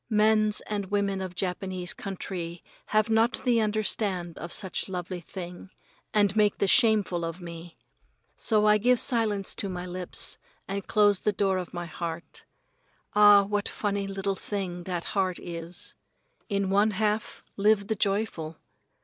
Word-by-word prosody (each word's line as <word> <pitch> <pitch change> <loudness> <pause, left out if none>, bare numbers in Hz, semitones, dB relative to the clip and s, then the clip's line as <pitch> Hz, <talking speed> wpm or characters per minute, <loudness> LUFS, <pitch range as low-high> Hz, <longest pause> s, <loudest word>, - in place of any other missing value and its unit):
Mens 215 -1 +3
and 200 -3 -4
women 200 -1 0
of 185 -1 -5
Japanese 185 -1 -3
country 180 -3 -6 0.2
have 215 0 +2
not 225 +2 +2
the 240 -3 +3
understand 205 -5 0
of 170 +2 -6
such 190 0 0
lovely 180 0 -4
thing, 175 +1 -8 0.4
and 205 -1 +3
make 210 -2 +3
the 200 - +1
shameful 205 -5 +4
of 165 +2 -4
me. 170 -1 -9 0.6
So 215 -2 +2
I 210 0 +5
give 245 +3 +4
silence 215 -6 +2
to 200 - 0
my 180 -1 -5
lips 180 0 -4 0.3
and 195 0 -4
close 205 -2 +4
the 210 - +2
door 195 -2 +1
of 180 - -6
my 175 -1 -5
heart. 170 0 -6 0.7
Ah, 205 -1 +8
what 205 0 -1
funny 200 -1 -2
little 195 0 -2
thing 185 -3 -4
that 175 -2 -3
heart 190 -3 +1
is! 170 0 -6 0.6
In 200 -2 0
one 205 +2 +4
half 215 +1 -1
live 205 0 +3
the 220 +2 -1
joyful. 195 -6 -1
195 Hz, 150 wpm, -27 LUFS, 180-210 Hz, 0.7 s, Ah